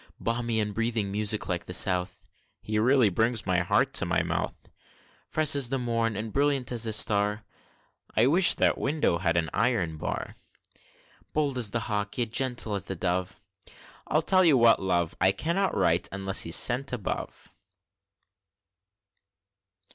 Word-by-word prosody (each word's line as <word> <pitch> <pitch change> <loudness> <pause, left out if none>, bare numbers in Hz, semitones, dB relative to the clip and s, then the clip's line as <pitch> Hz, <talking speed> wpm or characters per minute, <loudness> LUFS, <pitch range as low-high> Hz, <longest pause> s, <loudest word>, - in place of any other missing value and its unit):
Balmy 115 -1 -2
and 105 -1 -2
breathing 115 -2 -1
music 105 +1 -1
like 90 -2 -3
the 90 - -4
South, 90 -2 +1 0.3
(He 105 0 -3
really 125 0 +3
brings 110 +3 -1
my 90 -1 +1
heart 90 - +1
into - - -1
my - - +1
mouth!) - - -3 0.7
Fresh 155 -1 +2
as 135 -4 +1
the 135 - -1
morn, 115 -3 -1
and 110 +1 -5
brilliant 140 -3 0
as 115 -2 0
its 110 -1 +2
star, 105 +1 +1 0.7
(I 110 - +5
wish 175 +7 +5
that - - +1
window 140 - 0
had 85 -2 0
an 80 -2 -1
iron 105 -9 0
bar!) - - -5 1.0
Bold 145 -3 0
as 115 -4 +3
the 115 +3 -3
hawk, 105 -1 -3
yet 120 -3 -1
gentle 125 -3 +1
as 100 -1 -3
the 95 - -5
dove, 90 +1 -3 0.7
(I'll 155 +1 +1
tell 185 +2 +4
you 155 -6 +4
what, 115 -1 +5
my - - -6
love, 85 -3 0
I 95 +1 +5
cannot 170 - -2
write, 85 +2 +1
unless 95 0 -1
he's 85 - +1
sent 130 +3 +2
above!) 115 -7 -5
110 Hz, 160 wpm, -27 LUFS, 95-125 Hz, 1.0 s, I